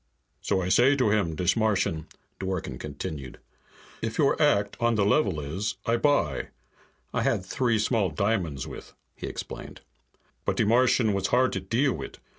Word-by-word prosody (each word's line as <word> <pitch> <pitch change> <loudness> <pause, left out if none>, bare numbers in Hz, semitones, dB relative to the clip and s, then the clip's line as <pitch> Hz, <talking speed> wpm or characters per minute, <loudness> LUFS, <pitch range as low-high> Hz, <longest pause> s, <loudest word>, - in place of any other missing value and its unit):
"So 95 - 0
I 90 - -2
say 125 +8 +5
to 125 -6 +2
him, 95 -7 +1
dis 90 +3 +1
Martian," 100 -8 0 0.3
Dworken 95 -9 -3
continued, 70 -5 -6 0.6
"'If 115 0 -3
your 145 0 +2
act 100 -9 +3
on 120 -1 +2
the 105 -2 +2
level 100 - +2
is, 95 +8 -3
I 115 +1 +2
buy.' 120 - +1 0.7
I - - +1
had 95 - 0
three 120 +2 +1
small 105 -2 +1
diamonds 85 -5 -1
with," - - -10 0.2
he - - -6
explained. - - -7 0.6
"But - - -1
de - - +3
Martian 115 -1 +3
was 100 -1 0
hard 130 +1 +2
to - - -1
deal 130 +3 +1
wit'. - - -7
105 Hz, 165 wpm, -27 LUFS, 90-120 Hz, 0.7 s, say